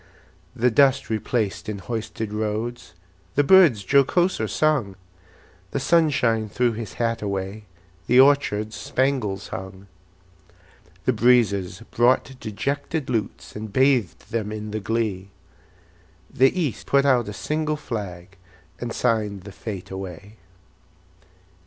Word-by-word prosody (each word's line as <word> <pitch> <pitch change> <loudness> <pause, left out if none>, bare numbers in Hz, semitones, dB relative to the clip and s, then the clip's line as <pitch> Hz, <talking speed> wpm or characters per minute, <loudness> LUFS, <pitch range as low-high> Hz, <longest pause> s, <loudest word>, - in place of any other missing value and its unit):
The 125 0 +2
dust 135 +1 +3
replaced 110 -1 -2
in 105 - -3
hoisted 110 0 -5
roads, 110 -1 -3 0.4
The 145 - +4
birds 150 - +6
jocoser 140 - +2
sung; 140 -11 +1 0.7
The 140 - -2
sunshine 130 -8 +2
threw 120 +4 +1
his 110 -2 -6
hat 115 -1 -1
away, 100 +1 -4 0.4
The 125 - +5
orchards 120 -6 +3
spangles 105 -3 -1
hung. 95 0 -8 1.2
The - - +3
breezes 105 -5 +2
brought 130 +2 +2
dejected 140 +6 -3
lutes, 110 -4 -3
And 105 0 -6
bathed 125 - +1
them 110 -2 -2
in 105 0 -5
the 110 - -2
glee; 105 -3 -2 1.0
The 135 +8 +3
East 150 -9 -2
put 140 0 +3
out 125 -5 +3
a - - -4
single 155 +5 -2
flag, 100 -8 -6 0.4
And 120 -1 -4
signed 105 -5 0
the 100 - -9
fete 95 -2 -7
away. 95 +2 -8
115 Hz, 120 wpm, -23 LUFS, 105-130 Hz, 1.2 s, birds